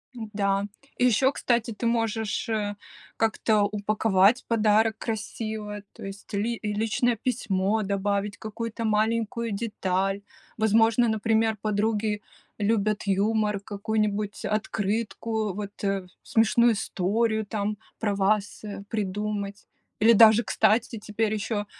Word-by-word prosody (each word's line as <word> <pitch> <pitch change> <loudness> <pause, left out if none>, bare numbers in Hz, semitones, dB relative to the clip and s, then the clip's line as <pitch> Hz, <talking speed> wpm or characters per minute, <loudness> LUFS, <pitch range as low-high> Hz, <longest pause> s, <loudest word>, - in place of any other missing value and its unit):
М-да. 200 -3 -1 0.3
И 250 - +3
ещё, 250 +3 +4
кстати, 235 -4 0
ты 220 +2 -5
можешь, 225 -1 0
э, 210 -2 -1 0.4
как-то 220 -1 +2
упаковать 210 +1 +2
подарок 220 -1 +3
красиво, 215 -2 -4
то - - -12
есть, 195 +2 -9
ли 220 +3 -1
личное 220 +3 +1
письмо 215 -3 0
добавить, 200 0 -1
какую-то 225 +2 -5
маленькую 225 +1 0
деталь. 195 -2 -1 0.4
Возможно, 225 +2 +4
например, 220 0 +1
подруги 210 0 0 0.4
любят 210 0 +1
юмор, 210 +1 +1
какую-нибудь 210 0 -2
открытку, 215 0 -1
вот, 205 +1 -7
э, 195 -2 -1 0.2
смешную 230 +1 +4
историю 220 +3 0
там 210 0 -2 0.2
про 205 -3 0
вас, 200 +2 0
э, 205 -1 -6
придумать. 205 0 -3 0.3
Или 230 +2 +7
даже, 225 +1 +7
кстати, 225 +3 +2
теперь 210 +1 -1
ещё 210 -1 -2
215 Hz, 115 wpm, -26 LUFS, 205-225 Hz, 0.4 s, Или